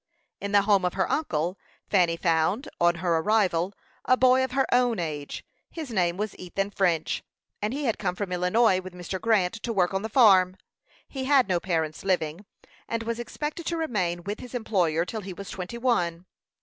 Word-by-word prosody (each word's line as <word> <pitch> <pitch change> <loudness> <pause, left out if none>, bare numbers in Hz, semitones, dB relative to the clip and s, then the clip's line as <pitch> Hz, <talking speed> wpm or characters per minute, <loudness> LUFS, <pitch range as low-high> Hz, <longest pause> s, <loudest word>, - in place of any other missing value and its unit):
In 200 - -4
the 205 -1 +5
home 200 -2 +3
of 180 0 -1
her 190 -1 +1
uncle, 180 - -1 0.3
Fanny 175 -4 +2
found, 170 - +1
on 175 0 +4
her 170 -2 +3
arrival, 185 -2 +2 0.3
a 255 - +3
boy 255 0 +5
of 260 -1 -3
her 270 0 +2
own 245 -2 +3
age. 150 -4 -4 0.2
His 310 -6 -7
name 180 -4 +1
was 210 0 -3
Ethan 195 +3 -3
French; 175 -5 0 0.4
and 210 +1 -1
he 285 +3 -3
had 230 - 0
come 180 -3 -1
from 195 0 -4
Illinois 185 +2 +3
with 185 -1 -10
Mr. 180 +1 -5
Grant 215 -5 +2
to 235 - -3
work 190 -4 +1
on 195 - 0
the 220 - -4
farm. 190 -6 +5 0.5
He 265 -2 -5
had 270 -4 +4
no 180 -3 +1
parents 160 -3 -2
living, 180 0 -1 0.4
and 230 0 -2
was 230 +1 -3
expected 300 +7 -5
to 335 - -1
remain 185 - -1
with 205 +3 -4
his 250 0 -9
employer 175 -8 +1
till 220 +3 -5
he 190 -1 -7
was 200 +2 -8
twenty 185 +5 -6
one. 180 -9 0
195 Hz, 195 wpm, -26 LUFS, 175-230 Hz, 0.5 s, the